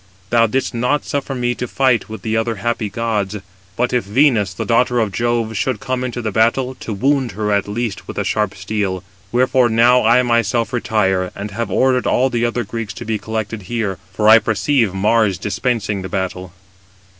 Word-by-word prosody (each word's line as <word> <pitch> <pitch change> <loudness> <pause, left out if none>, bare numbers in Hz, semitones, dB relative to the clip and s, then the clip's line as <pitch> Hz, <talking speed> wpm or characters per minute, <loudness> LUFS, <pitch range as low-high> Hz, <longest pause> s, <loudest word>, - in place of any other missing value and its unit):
Thou 115 -1 +4
didst 130 +4 -1
not 125 +5 0
suffer 140 -1 -3
me 120 -1 0
to 125 +1 -5
fight 130 -4 +1
with 110 - -8
the 110 -1 -1
other 115 +1 0
happy 110 0 -2
gods; 105 -3 -2 0.4
but 125 +3 0
if 125 - +2
Venus, 105 -2 +2
the 90 - -5
daughter 120 +1 +2
of 110 -3 0
Jove, 115 +1 -1
should 115 +1 -1
come 130 +2 -2
into 120 -1 -4
the 110 - -1
battle, 120 +5 +1
to - - -6
wound 130 +2 0
her 105 +1 -2
at 100 0 +1
least 110 0 -4
with - - -7
the - - -1
sharp 105 -3 -1
steel. 95 0 -3 0.3
Wherefore 125 0 +3
now 120 +3 +4
I 120 +3 +5
myself 115 -1 +1
retire, 95 -6 0
and 100 +1 -6
have 115 +1 -3
ordered 130 +5 +2
all 130 +1 +2
the 120 0 0
other 120 0 -1
Greeks 115 -4 -5
to - - -7
be 110 -1 -2
collected 110 -1 -4
here: 110 -6 -2
for 105 +2 0
I 110 +1 +9
perceive 110 +1 +1
Mars 100 0 +2
dispensing 105 +1 -2
the 95 - -6
battle." 95 -1 -3
115 Hz, 195 wpm, -18 LUFS, 105-120 Hz, 0.4 s, I